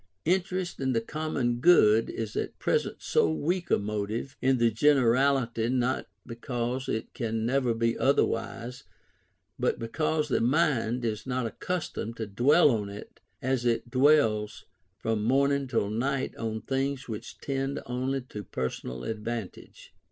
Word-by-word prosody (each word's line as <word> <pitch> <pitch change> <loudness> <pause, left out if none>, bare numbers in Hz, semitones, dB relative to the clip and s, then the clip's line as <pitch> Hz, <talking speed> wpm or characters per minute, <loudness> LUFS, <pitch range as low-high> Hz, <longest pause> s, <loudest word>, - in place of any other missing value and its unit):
Interest 180 +1 0
in 130 -1 0
the 115 - +2
common 120 -2 -2
good 115 -9 +5
is 110 -2 -5
at - - -3
present - - -1
so 85 - +3
weak 170 - -1
a - - +4
motive 105 +5 -3
in 130 0 +3
the 115 -1 +3
generality 125 -2 +3
not 130 0 0 0.2
because 120 +2 -3
it 110 - -3
can 110 -1 -2
never 125 -1 +1
be 115 0 +1
otherwise, 120 -3 0 0.8
but - - +1
because 150 +6 -1
the 135 - +1
mind 125 -3 +1
is 110 +1 -3
not 130 -1 -1
accustomed 115 -3 -4
to 110 - -3
dwell 135 - +4
on 105 -4 -1
it 100 +1 -10 0.2
as 130 -1 0
it 120 0 0
dwells 130 -6 +3 0.3
from 110 -1 -1
morning 140 +3 +2
till 115 -4 0
night 135 +4 -1
on 110 -1 -3
things 135 +2 -2
which 110 -3 -7
tend 135 0 -2
only 130 +2 -2
to 105 -4 -8
personal 65 -3 -4
advantage. 110 - -6
120 Hz, 145 wpm, -28 LUFS, 115-135 Hz, 0.8 s, good